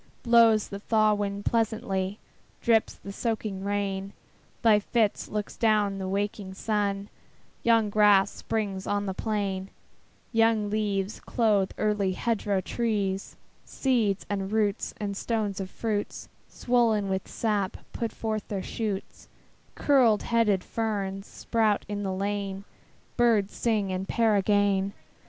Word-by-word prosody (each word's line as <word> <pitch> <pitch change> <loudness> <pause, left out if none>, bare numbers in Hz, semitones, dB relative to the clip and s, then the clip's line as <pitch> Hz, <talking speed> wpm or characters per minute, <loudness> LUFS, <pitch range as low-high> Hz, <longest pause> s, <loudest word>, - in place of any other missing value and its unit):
Blows 230 -3 +5
the 200 - -6
thaw 215 0 +3
wind 205 -1 -3
pleasantly, 210 -4 0 0.4
Drips 225 -2 +2
the 200 - -9
soaking 215 -3 -3
rain, 200 -1 -2 0.5
By 215 -2 +6
fits 215 0 0
looks 210 -1 -4
down 210 -3 +2
the 190 - -3
waking 200 0 -3
sun: 200 -1 -1 0.5
Young 225 -3 +3
grass 205 -2 +5
springs 200 -4 -3
on 205 0 0
the 190 - -2
plain; 195 -2 -2 0.6
Young 225 -2 +2
leaves 205 -1 -1
clothe 210 -5 +1
early 210 -3 +1
hedgerow 205 -2 0
trees; 200 -2 -2 0.3
Seeds, 225 -7 0
and 195 -1 -3
roots, 215 -2 0
and 205 -2 -3
stones 210 -2 -2
of 190 -1 -4
fruits, 210 0 -3 0.2
Swollen 230 -4 +1
with 190 -1 -2
sap, 205 -4 -1 0.2
put 230 -1 -2
forth 215 -2 -3
their 195 -3 -3
shoots; 210 -4 -4 0.5
Curled 250 -7 +4
headed 220 -5 +2
ferns 200 -3 -3
sprout 220 -3 0
in 205 -1 -3
the 195 -2 -2
lane; 195 0 -3 0.5
Birds 225 -5 +3
sing 215 -5 0
and 185 +1 -3
pair 225 -3 +2
again. 200 -1 +2
205 Hz, 130 wpm, -27 LUFS, 195-220 Hz, 0.6 s, By